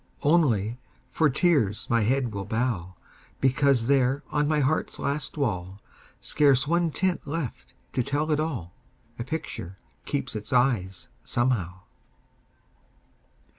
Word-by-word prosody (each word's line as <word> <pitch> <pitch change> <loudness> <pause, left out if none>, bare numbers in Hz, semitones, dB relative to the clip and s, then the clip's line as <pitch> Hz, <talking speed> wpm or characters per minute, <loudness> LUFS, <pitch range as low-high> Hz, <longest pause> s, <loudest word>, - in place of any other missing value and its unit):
Only, 125 - +3 0.3
for 160 -2 +3
tears 140 - +2
my 115 -1 +2
head 125 +1 +1
will 100 -1 -4
bow, 110 -6 -1 0.4
Because 135 -2 +3
there 135 +1 +2
on 150 0 +1
my 155 0 +2
heart's 145 +3 0
last 140 +1 -2
wall, 95 -8 -2 0.4
Scarce 140 -2 +3
one 170 +1 +2
tint 180 0 -1
left 145 -4 -5 0.2
to 125 - +1
tell 145 +5 -1
it 150 - +2
all, 125 - -3 0.5
A - - -1
picture 120 - -5 0.3
keeps 135 -4 -3
its 105 -1 -4
eyes, 120 -5 +1
somehow. 100 -8 0
130 Hz, 125 wpm, -26 LUFS, 110-150 Hz, 0.5 s, Only